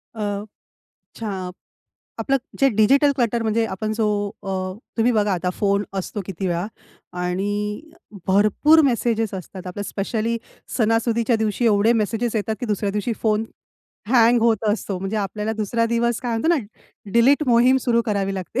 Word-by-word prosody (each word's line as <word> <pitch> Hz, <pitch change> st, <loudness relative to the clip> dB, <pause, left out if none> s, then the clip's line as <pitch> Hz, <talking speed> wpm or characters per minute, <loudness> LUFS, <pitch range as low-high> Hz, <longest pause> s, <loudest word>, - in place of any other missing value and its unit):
अ, 205 Hz, -1 st, -3 dB, 0.7 s
छा 225 Hz, -, -5 dB, 0.9 s
आपलं 275 Hz, 0 st, +1 dB, 0.2 s
जे 275 Hz, -, +5 dB
डिजिटल 275 Hz, +7 st, +5 dB
क्लटर 235 Hz, -2 st, 0 dB
म्हणजे 225 Hz, +1 st, +1 dB
आपण 215 Hz, +1 st, -3 dB
जो 220 Hz, 0 st, 0 dB, 0.4 s
अ, 195 Hz, -, -5 dB, 0.5 s
तुम्ही 230 Hz, +2 st, +3 dB
बघा 210 Hz, -3 st, +2 dB
आता 180 Hz, 0 st, -1 dB
फोन 200 Hz, 0 st, +1 dB
असतो 195 Hz, +2 st, -4 dB
किती 190 Hz, 0 st, -4 dB
वेळा 175 Hz, +1 st, -1 dB, 0.6 s
आणि 205 Hz, +4 st, -2 dB, 0.5 s
भरपूर 215 Hz, +11 st, +5 dB
मेसेजेस 230 Hz, -4 st, 0 dB
असतात. 185 Hz, 0 st, -7 dB
आपलं 190 Hz, +3 st, -5 dB
स्पेशली 220 Hz, +3 st, -2 dB, 0.4 s
सणासुदीच्या 230 Hz, +1 st, +2 dB
दिवशी 220 Hz, +2 st, 0 dB
एवढे 215 Hz, +1 st, +4 dB
मेसेजेस 225 Hz, +2 st, -2 dB
येतात, 220 Hz, +1 st, -1 dB
की 245 Hz, -, -3 dB
दुसऱ्या 210 Hz, -2 st, -1 dB
दिवशी 210 Hz, +3 st, -1 dB
फोन 215 Hz, -1 st, +2 dB, 0.7 s
हँग 240 Hz, -1 st, +5 dB
होत 230 Hz, -1 st, +2 dB
असतो. 205 Hz, -2 st, -1 dB
म्हणजे 195 Hz, +3 st, -3 dB
आपल्याला 210 Hz, +1 st, -2 dB
दुसरा 225 Hz, +2 st, 0 dB
दिवस 235 Hz, 0 st, 0 dB
काय 240 Hz, -3 st, -2 dB
म्हणतो 225 Hz, +8 st, 0 dB
ना, -, -, +2 dB, 0.6 s
डिलीट 260 Hz, +6 st, +4 dB
मोहीम 245 Hz, +2 st, +5 dB
सुरू 235 Hz, -2 st, +2 dB
करावी 200 Hz, -3 st, -1 dB
लागते. 190 Hz, +6 st, -3 dB
220 Hz, 150 wpm, -22 LUFS, 205-235 Hz, 0.9 s, जे